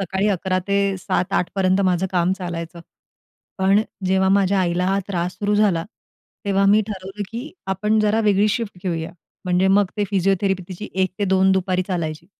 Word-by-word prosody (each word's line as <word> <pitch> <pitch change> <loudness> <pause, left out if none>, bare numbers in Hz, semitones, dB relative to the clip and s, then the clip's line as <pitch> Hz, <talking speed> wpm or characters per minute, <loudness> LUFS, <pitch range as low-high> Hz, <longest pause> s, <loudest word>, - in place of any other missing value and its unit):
सकाळी 195 +2 0
11 185 -1 0
ते 200 -1 +1
7-8 180 -1 -1
पर्यंत 190 0 +2
माझं 185 0 +1
काम 180 0 +2
चालायचं. 170 -2 -6 0.8
पण 195 +2 +4 0.3
जेव्हा 190 0 +2
माझ्या 195 0 +3
आईला 180 0 0
हा 195 +1 +1
त्रास 180 -2 -2
सुरू 205 0 0
झाला, 200 -6 +2 0.6
तेव्हा 195 -1 +2
मी 210 +2 +5
ठरवलं, 195 0 -6
की 245 +7 -6 0.2
आपण 210 +3 +1
जरा 215 +1 +2
वेगळी 210 -1 +3
शिफ्ट 215 -3 -3
घेऊया. 165 -3 -3 0.3
म्हणजे 180 +1 +2
मग 200 +1 +4
ते 205 - +1
फिजिओथेरपी 195 0 +1
तिची 195 +3 -7
1-2 190 0 +2
दुपारी 185 -1 0
चालायची. 165 -3 -3
190 Hz, 160 wpm, -21 LUFS, 180-200 Hz, 0.8 s, मी